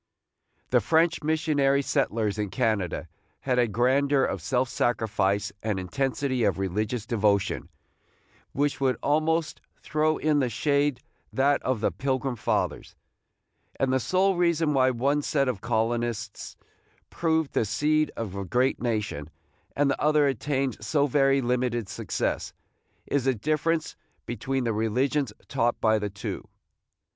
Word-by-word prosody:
The - - +4
French 165 +1 +2
missionary 150 -3 +2
settlers 110 -7 0
in 105 -1 -1
Canada 95 - -1 0.3
had 125 -2 +1
a 120 - +3
grandeur 135 +5 +2
of 95 - -1
self 125 +7 0
sacrifice, 105 -4 0
and 105 -3 -1
intensity 130 +5 -1
of 100 -3 +2
religious 105 +4 -2
devotion, 105 -4 0 0.8
which 140 -1 -1
would 130 -2 +2
almost 155 +2 +1 0.2
throw 155 +1 +1
in 150 -1 +2
the 130 -3 +1
shade 140 +1 +1 0.3
that 140 +2 +2
of 130 -5 -1
the - - +1
Pilgrim 130 -1 -2
Fathers; 110 - -2 0.8
and 135 -1 +1
the 130 - +3
sole 190 +8 +2
reason 170 -3 +2
why 130 -1 +4
one 135 +4 +1
set 140 -1 +1
of 120 -7 -2
colonists 115 -1 -2 0.5
proved 160 -3 0
the - - +2
seed 150 +8 +1
of 110 -5 -4
a 100 - -3
great 125 +8 +1
nation, 105 - -2 0.5
and 140 -1 +2
the - - -3
other 150 -1 +4
attained 135 -3 -1
so 140 +6 +2
very 135 0 +3
limited 120 -3 0
success, - - -3 0.5
is 140 -3 0
the 130 -1 +2
difference 155 +6 -1 0.3
between 130 +2 -2
the 115 -2 0
religions 125 +5 0 0.2
taught 120 +1 0
by 110 -1 +3
the 105 0 -3
two. 100 0 -6
130 Hz, 140 wpm, -26 LUFS, 110-145 Hz, 0.8 s, The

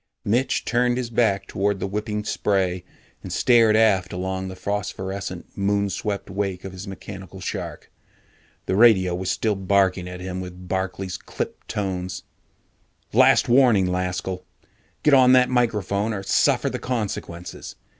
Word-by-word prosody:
Mitch 120 +6 +1
turned 120 +1 +1
his 125 -2 -3
back 100 -4 +2
toward 100 +1 -1
the - - -2
whipping 105 +1 -3
spray 95 -4 0 0.4
and - - -8
stared 115 -3 +4
aft 100 -5 +3
along 95 +1 -3
the 95 - -7
phosphorescent, 95 -1 -4
moon 100 0 0
swept 100 -1 -3
wake 95 -1 -3
of 95 - -6
his 95 +2 -9
mechanical 95 -1 -9
shark. 95 - -6 0.7
The 95 - 0
radio 95 -5 +5
was 90 +1 -3
still 110 +3 +1
barking 95 -2 +1
at 90 0 -7
him 95 0 -5
with 90 0 -9
Barkley's 95 0 -3
clipped - - -6
tones. 90 -3 -3 0.9
"Last 130 +4 +5
warning, 120 -6 +5
Laskell! 90 0 -2 0.6
Get 150 - +4
on 130 -1 +7
that 125 -1 +5
microphone 110 -3 0
or 95 - -5
suffer 95 - +2
the - - -2
consequences! 95 -7 -5
95 Hz, 145 wpm, -23 LUFS, 95-110 Hz, 0.9 s, on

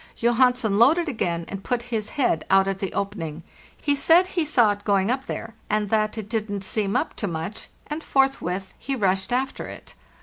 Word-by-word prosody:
Johansen 240 -3 +3
loaded 320 +9 +5
again, 170 - -2
and 195 -1 -6
put 245 -1 -1
his 215 -1 -1
head 205 - +1
out 195 0 +5
at 195 -1 -2
the 195 - -3
opening. 170 -6 -4 0.4
He 285 - +1
said 330 +5 +5
he 365 -2 -1
saw 245 -8 +4
it 205 0 -5
going 200 +1 +2
up 265 +1 -2
there, 225 0 -5 0.2
and 210 -1 0
that 215 0 +1
it 215 -2 -5
didn't 210 -3 -3
seem 200 0 -1
up - - 0
to 205 - -2
much, 165 +4 -5 0.2
and 305 +2 -5
forthwith 195 -9 0
he 275 - -2
rushed 190 -2 0
after 260 +2 -1
it. - - -10
215 Hz, 195 wpm, -24 LUFS, 195-260 Hz, 0.4 s, loaded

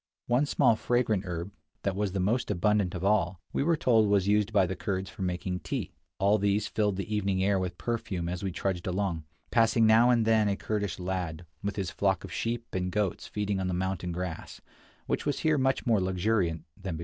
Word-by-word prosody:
One 125 +4 +2
small 115 - +4
fragrant 110 -4 0
herb, 85 +2 -4 0.3
that 100 -2 0
was 100 -1 -1
the 95 - -2
most 115 +7 0
abundant 100 0 +1
of 90 - -4
all, 95 -4 +2
we - - 0
were 165 +3 +2
told 115 -7 +3
was 100 -2 +3
used 105 +1 +2
by 100 -3 +4
the 95 +1 -3
Kurds 95 -1 -3
for - - -10
making 90 0 -2
tea. - - -4 0.3
All 100 +2 +3
these 100 +1 +1
filled 105 -3 0
the 100 +3 -3
evening 95 -2 0
air 100 0 +2
with 90 -1 -3
perfume 95 -7 -3
as 90 +1 -3
we 95 - -2
trudged 90 0 -2
along, 90 -4 -1 0.3
passing 115 0 +4
now 115 +3 +6
and 120 -3 +3
then 110 -1 +4
a 100 - +1
Kurdish 105 -4 -2
lad, 90 -2 -3 0.2
with 100 +1 -2
his 95 -3 -2
flock 95 -3 0
of - - -8
sheep 115 0 -2
and 90 0 -1
goats 105 -2 -1
feeding 105 -2 -2
on 95 - -1
the 90 - -1
mountain 90 -1 -2
grass, 90 -1 -5 0.5
which - - -2
was 145 - -1
here 155 -2 +2
much 135 0 +1
more 110 -5 +3
luxuriant 90 -2 0
than 95 -5 -5
below. - - -8
100 Hz, 215 wpm, -29 LUFS, 90-110 Hz, 0.5 s, now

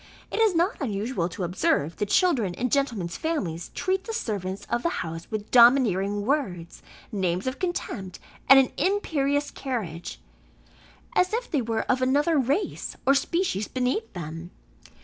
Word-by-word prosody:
It - - -2
is 440 -5 +4
not 350 +6 +1
unusual 210 -6 -1
to 185 - -5
observe 170 -3 0
the 210 - -1
children 240 - +2
in 245 +4 -2
gentlemen's 230 -12 0
families 190 - -3
treat 380 +1 -1
the 450 - -4
servants 200 - -3
of 240 - -1
the 340 - +1 0.2
house 165 +1 -7
with 215 -1 -5
domineering 210 -5 +5
words, 195 - -2 0.3
names 185 -2 -1
of 260 +1 -3
contempt, 240 - -3 0.3
and 270 - +10
an 265 -2 +4
imperious 290 -7 0
carriage, 205 - -5 1.0
as 365 +3 +3
if 480 +2 -2
they 295 -6 +1
were 225 -1 -1
of 255 0 0
another 290 +5 +3
race, 275 - -1
or 275 - +6
species 280 - 0
beneath 255 - -2
them. 165 0 -7
250 Hz, 150 wpm, -26 LUFS, 190-295 Hz, 1.0 s, and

